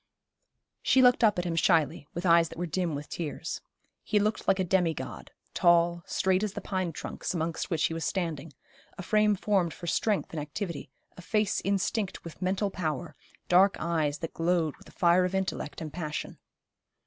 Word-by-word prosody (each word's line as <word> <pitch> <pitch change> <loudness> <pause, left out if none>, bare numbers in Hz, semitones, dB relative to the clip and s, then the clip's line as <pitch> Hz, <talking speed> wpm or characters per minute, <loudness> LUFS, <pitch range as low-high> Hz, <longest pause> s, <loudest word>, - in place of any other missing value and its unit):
She 260 - +4
looked 250 -1 +5
up 215 -4 +5
at 175 - -1
him 170 -1 -1
shyly, 160 -4 +2
with 175 +2 -3
eyes 170 -1 +5
that - - -11
were 175 - -2
dim 175 -1 -1
with 145 +1 -6
tears. 160 -4 -5 0.4
He 215 - +1
looked 210 +1 0
like 195 - +4
a 190 - +1
demi 175 -3 +2
god, - - -7 0.2
tall, 170 0 +4
straight 190 0 +1
as 210 -2 -2
the - - -4
pine 185 -3 -2
trunks 165 - -5
amongst 165 0 -2
which 165 -4 0
he - - +1
was 165 0 -3
standing, 165 -4 -2 0.5
a 190 - -6
frame 210 +2 +3
formed 190 -4 0
for 175 - -9
strength 205 +4 0
and 155 - -2
activity, 155 0 -5 0.3
a - - -9
face 210 +3 0
instinct 200 +1 -1
with 170 +2 -10
mental 195 +2 0
power, 155 -8 -3 0.3
dark 190 +3 +5
eyes 155 -3 0
that 165 - -6
glowed 165 -2 +1
with - - -18
the - - -14
fire 180 -1 +4
of 180 +1 -1
intellect 190 -5 -3
and 155 -2 -6
passion. 155 -4 -5
175 Hz, 190 wpm, -29 LUFS, 165-190 Hz, 0.5 s, looked